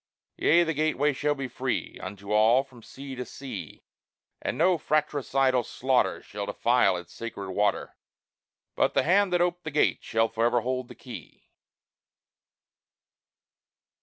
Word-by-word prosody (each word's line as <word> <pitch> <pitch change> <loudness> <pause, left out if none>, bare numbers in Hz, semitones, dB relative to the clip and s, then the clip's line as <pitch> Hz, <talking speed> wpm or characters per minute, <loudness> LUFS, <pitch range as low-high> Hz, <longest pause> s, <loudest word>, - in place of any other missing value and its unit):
Yea, 170 +3 +4
the 165 -1 -1
gateway 150 -1 +1
shall 145 +2 0
be 135 -2 -4
free - - -3
Unto 100 +1 -7
all, 110 +5 +5
from 130 -4 -17
sea 135 +4 -9
to 125 -1 -4
sea; 125 -2 -8 0.6
And - - -3
no 175 +1 +3
fratricidal 135 -4 +1
slaughter 130 +3 0
Shall - - -6
defile 90 - +2
its 90 0 -10
sacred 100 -4 -6
water; 105 +2 0 0.8
But - - +1
the - - +4
hand 195 +3 +3
that 175 -1 +2
ope'd 175 0 0
the 155 - -4
gate 150 0 +2
shall 115 0 +1
forever 115 +2 +1
hold 130 +1 -2
the - - -12
key! - - -12
130 Hz, 140 wpm, -27 LUFS, 115-155 Hz, 0.8 s, all